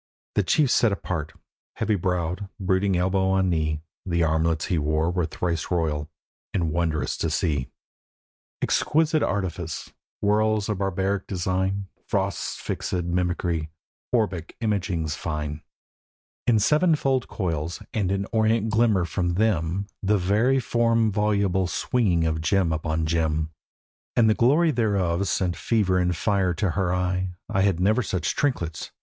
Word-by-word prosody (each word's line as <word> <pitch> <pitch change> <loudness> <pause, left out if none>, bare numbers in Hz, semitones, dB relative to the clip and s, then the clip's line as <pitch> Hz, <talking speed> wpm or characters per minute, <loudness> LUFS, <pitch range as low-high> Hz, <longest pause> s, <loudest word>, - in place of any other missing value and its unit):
The - - +3
chief 130 - +2
sat 115 - +4
apart, 85 -5 -3 0.4
heavy 110 - 0
browed, 90 0 -1
brooding 95 0 +1
elbow 95 +1 +1
on 95 -1 +2
knee; 80 -2 -1 0.2
The 85 -2 0
armlets 80 0 +1
he 90 -5 0
wore 80 +3 +1
were 90 -3 0
thrice 85 0 -2
royal, 80 -4 -1 0.5
and 85 -5 +1
wondrous 80 -1 0
to - - -1
see: 70 -6 0 0.9
Exquisite 160 0 +2
artifice, 90 -6 -2 0.3
whorls 110 0 +2
of 105 -3 -1
barbaric 95 0 -1
design, 95 +1 -1 0.2
Frost's - - -1
fixèd 90 -1 -2
mimicry; 85 -2 -1 0.4
orbic 100 -9 -1
imaginings 95 -8 -1
fine 75 -1 -4 0.9
In 120 -3 +5
sevenfold 145 - +2
coils: 85 -4 -3
and 100 -4 0
in 100 0 0
orient 110 0 +2
glimmer 110 -5 +3
from 85 0 -1
them, 95 -3 +1 0.2
The 105 +1 +2
variform 115 +2 +2
voluble 100 -3 +1
swinging 90 -5 +1
of 80 -1 0
gem 85 +1 +2
upon 80 0 -1
gem. 80 -1 0 0.6
And 115 -2 +5
the 110 - +5
glory 145 +9 +4
thereof 100 - +1
sent 90 -2 0
fever 95 0 +1
and 90 0 +1
fire 95 -1 +1
to 100 -2 0
her 90 +1 0
eye. 90 0 -1 0.2
'I 95 - +2
had 95 -3 +2
never 105 +6 +3
such 95 -5 -2
trinkets! 85 - -1
95 Hz, 135 wpm, -25 LUFS, 85-105 Hz, 0.9 s, In